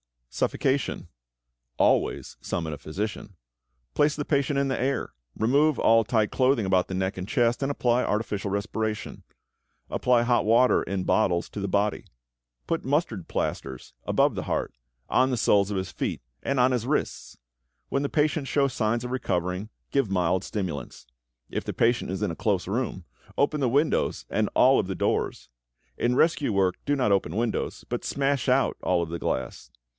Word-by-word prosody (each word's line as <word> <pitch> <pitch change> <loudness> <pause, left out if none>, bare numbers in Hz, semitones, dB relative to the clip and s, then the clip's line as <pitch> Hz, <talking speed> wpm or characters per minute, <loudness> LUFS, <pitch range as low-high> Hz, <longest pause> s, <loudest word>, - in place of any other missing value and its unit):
=Suffocation.= 135 -9 -1 0.7
Always - - +1
summon 80 -2 -3
a - - -5
physician. 100 +5 -5 0.6
Place 150 +1 +2
the 145 - -2
patient 140 -1 +1
in 140 0 +1
the 130 - -1
air, 135 -1 -1 0.3
remove 140 +6 +3
all 115 0 +4
tight 110 -1 +1
clothing 130 -4 +2
about 95 -1 +2
the - - -5
neck 95 +1 -1
and 90 0 -5
chest, 120 0 +1
and 135 - 0
apply 125 -3 +1
artificial 105 -2 -1
respiration. 105 +2 -3 0.7
Apply 125 -1 +3
hot 120 -2 +2
water 120 +3 +4
in 95 -1 -3
bottles 90 -4 +1
to - - -6
the 100 - -2
body. 100 +2 0 0.6
Put 165 - -2
mustard 135 - -1
plasters 65 -2 -4
above - - +3
the - - -4
heart, - - -2 0.4
on 130 +1 +3
the 125 - 0
soles 100 -2 +3
of 100 - -2
his 95 -1 -3
feet, - - -3 0.2
and 140 -1 -1
on 130 +1 +4
his 125 -1 -1
wrists. 150 - -2 0.5
When 135 - 0
the 140 - -1
patient 150 -1 +1
shows 140 -1 +1
signs 115 0 0
of 125 - -5
recovering, 90 -4 -2 0.2
give 135 -6 +1
mild 90 0 +1
stimulants. 90 - -5 0.4
If - - -4
the - - -3
patient 120 -3 +1
is 95 +3 -3
in 100 - 0
a - - -5
close 100 -5 0
room, 105 -3 -2 0.3
open 150 +2 +2
the 130 -3 +2
windows 145 +6 +1
and - - +1
all - - +6
of - - -1
the - - -3
doors. - - -1 0.5
In 120 +1 +1
rescue 145 -6 +2
work 95 -2 +2
do 145 - +2
not 125 -7 +1
open 100 0 +1
windows, 115 0 -2
but - - -3
smash 140 -2 0
out 130 +1 +2
all 90 -2 +1
of 80 - -6
the 85 0 -4
glass. 65 0 -3
115 Hz, 175 wpm, -26 LUFS, 95-135 Hz, 0.7 s, all